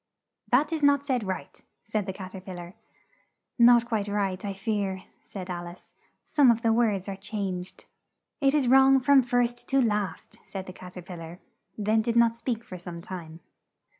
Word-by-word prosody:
'" - - -58
"That 290 +6 +3
is 315 - -2
not 285 -1 +4
said 255 -5 0
right," 185 -1 -5 0.2
said 215 -1 -2
the - - -1
Cat 185 -1 -9
er 190 - -7
pil 185 0 -8
lar. 175 +1 -9 0.9
"Not 235 0 +7
quite 220 -4 -1
right, 200 -2 -1
I 200 - -2
fear," 195 -1 -2 0.2
said 185 -3 -8
Al 175 -1 -5
ice, 175 +1 -13 0.3
"some 290 -4 +4
of 230 0 +2
the 225 -1 +3
words 215 -5 +1
are 195 - -4
changed." 190 -2 -5 0.5
"It 275 -1 +3
is 280 -4 +2
wrong 270 +1 +6
from 280 +1 +5
first 245 -1 0
to 270 - +3
last," 210 -7 -1
said 190 -1 -6
the 185 - -9
Cat 180 0 -10
er 180 - -7
pil 175 0 -9
lar; 165 +2 -9 0.4
then 215 +1 +2
did 230 +1 -1
not 235 -1 +4
speak 235 -1 -3
for 185 -5 -9
some 175 -1 -8
time. 170 -2 -8
210 Hz, 195 wpm, -27 LUFS, 185-240 Hz, 0.9 s, Not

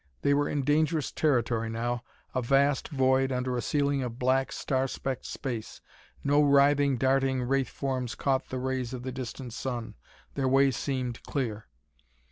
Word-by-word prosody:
They 140 - +4
were 145 0 +2
in 145 -2 -1
dangerous 150 +1 +1
territory 120 -6 +1
now 120 +2 -2 0.3
a 130 - 0
vast 135 +2 +2
void 135 -1 +2
under 125 0 -1
a 120 - -1
ceiling 140 -1 +1
of 120 -2 -4
black, 130 +1 +1
star 135 -1 0
specked 135 0 -4
space. 120 -6 -5 0.4
No 145 +1 +4
writhing, 140 -1 +4
darting 130 0 +2
wraith 135 +1 +1
forms 130 -3 -3
caught 135 -1 0
the 130 - -3
rays 130 -1 -2
of 125 - -7
the 130 - -4
distant 130 -1 -6
sun. 120 -4 -4 0.4
Their 135 -2 0
way 135 +1 +4
seemed 130 -2 -3
clear. 115 -6 -3
130 Hz, 160 wpm, -28 LUFS, 125-140 Hz, 0.4 s, They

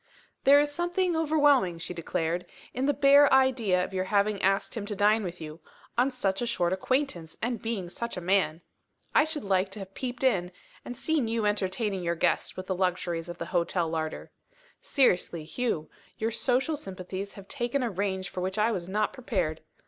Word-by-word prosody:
"There 280 +1 +8
is 290 0 +1
something 350 +2 0
overwhelming," 290 - +3
she 165 +2 -6
declared, 170 0 -2 0.3
"in 260 +2 -1
the - - +5
bare 280 +1 +6
idea 240 -9 +3
of 190 - -6
your 185 0 -1
having 200 0 +1
asked 195 +1 +1
him 220 - -3
to 210 - -3
dine 210 +2 +3
with 180 -1 -5
you 155 0 -8 0.4
on 245 +3 +3
such 200 -7 -1
a 240 - -1
short 180 -6 +1
acquaintance, 190 - -1
and 240 +1 -2
being 225 -6 -3
such 235 +6 -5
a - - -1
man! 180 -3 +1 0.5
I 305 - +5
should 310 -1 -4
like 190 -1 +1
to - - -7
have 195 0 -9
peeped 245 +1 -5
in, 185 -9 +2 0.3
and 245 - -7
seen 310 -7 0
you 225 -1 0
entertaining 205 -1 0
your 170 -1 -1
guest - - 0
with 185 - -5
the 190 - -1
luxuries 175 -2 -1
of 175 - -6
the - - -4
hotel 175 0 +1
larder. 160 -1 -4 0.5
Seriously, 180 - +2
Hugh, 165 -2 -2 0.3
your 225 +1 -1
social 260 +6 +1
sympathies 190 -3 -6
have 195 -1 -12
taken 255 0 -1
a 235 - -1
range 190 0 -2
for 185 - -5
which 190 +2 -2
I 215 +2 +3
was 180 -4 -4
not 210 +2 0
prepared. 185 -11 -2
200 Hz, 195 wpm, -28 LUFS, 180-250 Hz, 0.5 s, There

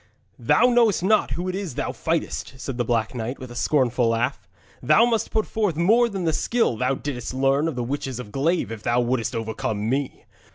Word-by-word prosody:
'Thou - - +4
knowest 235 -7 +3
not 215 +3 +3
who 180 +2 -3
it 185 - -2
is 190 -8 -4
thou - - -2
fightest,' 135 - -3
said 135 - -5
the - - +2
Black 115 -1 0
Knight, 120 +2 -4
with 130 -2 -9
a - - -10
scornful 125 -3 +1
laugh. 115 -3 -1 0.3
'Thou 220 - +5
must 230 -2 0
put 220 -1 0
forth 210 -7 -1
more 225 +9 +4
than 195 -4 -4
the 160 -2 +1
skill 230 - +1
thou 125 +4 0
didst 130 -3 -5
learn 135 +3 +2
of 160 - -3
the 125 - -2
witches 135 0 -4
of 110 -4 -8
Glaive 160 +1 0
if 110 -2 -6
thou 120 +2 +1
wouldst 120 -2 -1
overcome 110 -1 -3
me. 135 +2 -2
135 Hz, 210 wpm, -23 LUFS, 120-180 Hz, 0.3 s, Thou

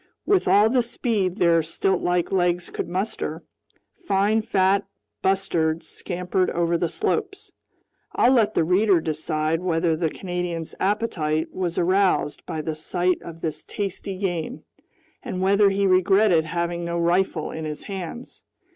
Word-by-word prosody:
With 395 -2 +2
all 205 +2 +6
the 250 +2 +3
speed 220 -6 -1
their 170 -4 +4
stiltlike 175 +1 0
legs 175 -2 0
could - - -4
muster, 190 +5 -3 0.6
fine 205 +1 +2
fat 200 -2 +2 0.4
bustards 170 -4 0
scampered 180 0 -2
over 170 0 0
the 170 0 0
slopes. 405 -1 -2 0.6
I'll 245 - +4
let 220 -5 +3
the - - +3
reader 185 +2 +3
decide 155 0 -1
whether 165 -2 +1
the 160 0 0
Canadian's 175 -2 -4
appetite 165 -6 -1
was 180 -2 -3
aroused 185 -5 +1
by 155 - -3
the 160 - -2
sight 175 +3 -1
of 165 -1 -10
this 160 - -3
tasty 195 -1 -5
game, 185 +5 -3 0.6
and 185 - -5
whether 200 +2 +4
he 195 0 +1
regretted 185 -2 +4
having 170 +1 -2
no 170 0 -2
rifle 170 -1 +1
in 160 0 -5
his 150 -1 -5
hands. 195 +4 -7
180 Hz, 140 wpm, -24 LUFS, 165-195 Hz, 0.6 s, all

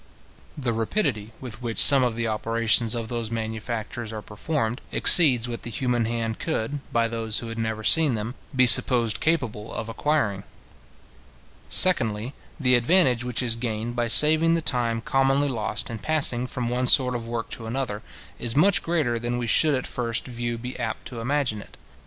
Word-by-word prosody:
The 125 -5 -2
rapidity 115 - -2
with 125 -2 -8
which 115 -2 -5
some 140 -2 +6
of 120 -3 0
the 115 0 -3
operations 115 +1 0
of 115 -1 -5
those 115 -1 -4
manufactures 110 +1 -5
are 110 -1 -7
performed, 120 +2 -4
exceeds 130 -9 +6
what 120 -1 -6
the - - -7
human 120 0 -1
hand 115 -1 -4
could, 140 +6 -3
by 115 0 +1
those 115 -1 -3
who 115 - -4
had 115 0 -7
never 110 -1 -4
seen 145 +4 +4
them, 110 +2 -5 0.2
be 130 0 +4
supposed 115 -2 +6
capable 125 -10 -2
of 115 - -6
acquiring. 115 -7 -1 1.3
Secondly, 120 - +2 0.3
the 125 -3 +2
advantage 125 -1 +3
which 125 0 -3
is 115 -2 0
gained 115 0 -5
by 120 -1 -1
saving 155 +6 +6
the 165 - -1
time 120 -5 -1
commonly 135 +3 +1
lost 110 -5 -4
in 115 -1 -7
passing 130 -3 +1
from 125 -1 -4
one 125 +1 -2
sort 125 0 +4
of 115 -2 -6
work 115 -1 -5
to 115 - -8
another, 115 -3 -4 0.4
is 120 -1 -2
much 180 +6 +3
greater 150 -9 -1
than 120 +1 -3
we 120 - -3
should 150 +6 +3
at 130 - -4
first 115 -2 -3
view 120 -1 -5
be 125 +2 -8
apt - - -5
to 120 - -8
imagine 125 -4 -2
it. - - -16
120 Hz, 180 wpm, -24 LUFS, 115-130 Hz, 1.3 s, some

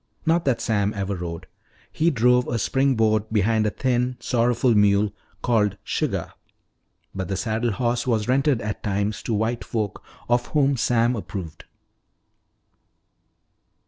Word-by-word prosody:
Not 165 +1 +2
that 135 -4 +1
Sam 105 -1 0
ever 100 0 -2
rode. 85 -2 -6 0.5
He 165 +2 +2
drove 125 -2 +3
a 120 - -1
spring 135 +4 +1
board 110 -1 +2
behind 110 +1 +2
a - - +2
thin, 125 +2 -1
sorrowful 120 +1 +2
mule 105 0 +3 0.3
called 105 -4 +2
"Suggah." - - -2 0.8
But 95 -2 -4
the 95 - -2
saddle 110 +3 -1
horse 120 +2 -1
was 110 -3 +1
rented 135 -1 +2
at 105 0 -4
times 100 +1 -1
to 115 - -3
white 115 +3 -1
folk 105 -4 -3 0.2
of 120 0 +1
whom 140 -2 +2
Sam 120 0 +2
approved. 90 -7 -7
115 Hz, 140 wpm, -23 LUFS, 105-125 Hz, 0.8 s, drove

